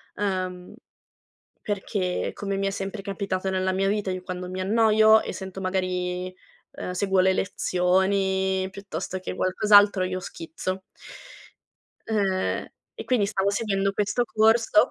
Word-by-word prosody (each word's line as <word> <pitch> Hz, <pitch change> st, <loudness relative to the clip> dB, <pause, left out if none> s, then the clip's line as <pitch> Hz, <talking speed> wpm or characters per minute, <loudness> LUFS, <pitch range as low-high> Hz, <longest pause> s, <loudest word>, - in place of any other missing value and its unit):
uhm, 185 Hz, -3 st, -3 dB, 0.9 s
perché 195 Hz, -3 st, -2 dB
come 200 Hz, -1 st, -3 dB
mi 195 Hz, 0 st, 0 dB
è -, -, -1 dB
sempre 195 Hz, +1 st, -5 dB
capitato 195 Hz, -1 st, -3 dB
nella 190 Hz, 0 st, 0 dB
mia 195 Hz, +1 st, 0 dB
vita 205 Hz, -1 st, 0 dB
io 185 Hz, 0 st, -4 dB
quando 180 Hz, 0 st, -6 dB
mi 185 Hz, 0 st, -5 dB
annoio 220 Hz, +2 st, +5 dB
e -, -, -5 dB
sento 190 Hz, 0 st, -7 dB
magari 185 Hz, -1 st, -2 dB, 0.4 s
uhm, -, -, -6 dB
seguo 190 Hz, 0 st, +2 dB
le 190 Hz, 0 st, +4 dB
lezioni 190 Hz, +1 st, +1 dB
piuttosto 190 Hz, -2 st, -6 dB
che 185 Hz, -, -5 dB
qualcos'altro, 205 Hz, +1 st, +4 dB
io 185 Hz, 0 st, -2 dB
schizzo. 185 Hz, +2 st, -5 dB, 1.2 s
Ehm, 195 Hz, -4 st, 0 dB, 0.3 s
e -, -, -7 dB
quindi 230 Hz, -6 st, +2 dB
stavo 195 Hz, 0 st, 0 dB
seguendo 195 Hz, -2 st, 0 dB
questo 210 Hz, +4 st, 0 dB
corso. 220 Hz, -1 st, +3 dB
190 Hz, 135 wpm, -25 LUFS, 185-205 Hz, 1.2 s, annoio